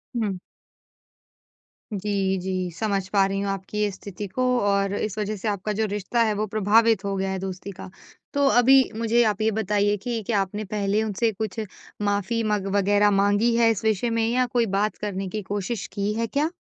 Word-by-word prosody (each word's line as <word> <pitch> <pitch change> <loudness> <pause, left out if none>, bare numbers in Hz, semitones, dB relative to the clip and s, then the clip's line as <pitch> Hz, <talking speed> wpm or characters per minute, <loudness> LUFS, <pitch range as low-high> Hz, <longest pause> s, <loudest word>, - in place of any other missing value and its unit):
हुँ। 205 -5 -1 1.6
जी, 195 -1 0
जी, 185 -1 -2
समझ 200 -4 -1
पा 195 -2 +3
रही 195 0 -2
हूँ 200 - -2
आपकी 195 +2 -6
ये 210 - +2
स्थिति 200 +1 -7
को 255 +7 -2 0.2
और 200 -1 +1
इस 215 0 -3
वजह 210 0 -2
से 205 - -5
आपका 205 0 -1
जो 220 +1 0
रिश्ता 210 +3 -1
है, 215 -1 +1
वो 210 +1 -1
प्रभावित 215 +1 +3
हो 195 0 -1
गया 190 0 -1
है 190 - -3
दोस्ती 190 +1 -6
का। 190 - -10 0.4
तो 285 0 +2
अभी 265 +1 +6
मुझे 230 +1 +3
आप 210 -1 0
ये 220 0 +2
बताइए 205 -1 +1
कि 230 +2 -3
क्या 210 -4 +2
आपने 205 +3 -4
पहले 205 +1 0
उनसे 220 +2 0
कुछ 220 +1 -4 0.4
माफ़ी 205 +3 0
मग 210 -2 0
वगैरह 205 +1 +3
माँगी 205 +4 +3
है 230 -1 +4
इस 220 - -3
विषय 220 +2 +1
में 225 - +2
या 250 +2 +2
कोई 240 -1 +1
बात 210 +1 0
करने 195 -2 -4
की 215 +2 -4
कोशिश 200 +2 -3
की 200 +1 -1
है 230 +1 -1
क्या? 295 +7 0
205 Hz, 200 wpm, -24 LUFS, 195-220 Hz, 1.6 s, अभी